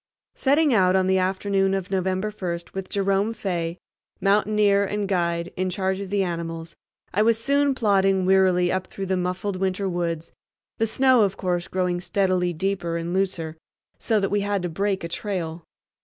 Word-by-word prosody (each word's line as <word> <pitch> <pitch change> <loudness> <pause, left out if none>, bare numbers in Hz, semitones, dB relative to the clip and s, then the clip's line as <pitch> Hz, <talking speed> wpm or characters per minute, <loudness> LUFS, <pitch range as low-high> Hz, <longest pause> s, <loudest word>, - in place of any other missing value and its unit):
Setting 290 +1 +3
out 185 -3 +4
on 190 -1 +3
the 190 0 +3
afternoon 195 +1 +1
of 190 -1 -4
November 190 +2 0
first, 175 -4 -5
with 190 -1 -5
Jerome 200 +2 0
Fay, 175 -4 -3 0.4
mountaineer 205 0 +3
and 205 0 -2
guide, 170 -2 -1
in 185 0 -1
charge 190 +1 -1
of 200 -1 -6
the 200 0 +1
animals, 165 -1 -5 0.4
I 205 - +2
was 225 +1 +4
soon 280 +3 +2
plodding 195 -5 +2
wearily 185 -2 +4
upward 185 0 -2
through 195 - -5
the 190 0 0
muffled 185 +2 -2
winter 190 +1 -1
woods, 170 -2 -3 0.5
the 225 - +2
snow 260 +1 +4
of 195 -2 +1
course 175 -2 -1
growing 180 -1 -1
steadily 185 -2 +1
deeper 175 -1 -2
and 170 +1 -3
looser, 175 -4 -1 0.4
so 220 -2 +1
that 195 -1 -1
we 205 0 +2
had 200 -2 -1
to 175 - -1
break 195 +3 -1
a - - -2
trail. 170 -3 -4
190 Hz, 175 wpm, -24 LUFS, 180-200 Hz, 0.5 s, out